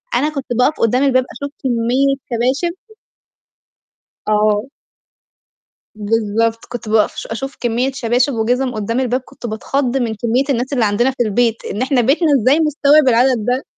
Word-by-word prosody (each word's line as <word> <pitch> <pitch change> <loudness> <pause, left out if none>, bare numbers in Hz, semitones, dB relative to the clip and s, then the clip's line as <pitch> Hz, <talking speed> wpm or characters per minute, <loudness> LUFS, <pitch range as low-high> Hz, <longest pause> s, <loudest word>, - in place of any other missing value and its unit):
أنا 300 - +1
كنت 275 -3 -5
باقف 290 +5 +2
قدّام 245 +4 +2
الباب 255 -2 +3
أشوف 285 0 -6
كمية 255 +3 +1 0.2
شباشب. 265 +9 0 1.5
آه. 210 +2 +1 1.3
بالضبط 225 +1 -1
كنت 240 -2 -7
باقف 215 -1 +2
ش - - -6
أشوف 270 +5 -5
كمية 245 +3 0
شباشب 250 +1 0
وجِزم 245 +3 0
قدّام 230 +4 -2
الباب 255 0 0
كنت 245 - -13
باتخض 255 +4 -1
من 230 -3 -1
كمية 235 +5 0
الناس 255 +2 -1
اللي 240 -5 +2
عندنا 240 +6 +1
في 250 -2 -1
البيت، 230 +1 0
إن 210 - -4
إحنا 260 -1 +2
بيتنا 295 +7 +2
إزاي 275 +7 +3
مستوعب 300 -2 +3
العدد 240 -2 +3
ده، 250 +2 0
245 Hz, 150 wpm, -17 LUFS, 225-270 Hz, 1.5 s, الباب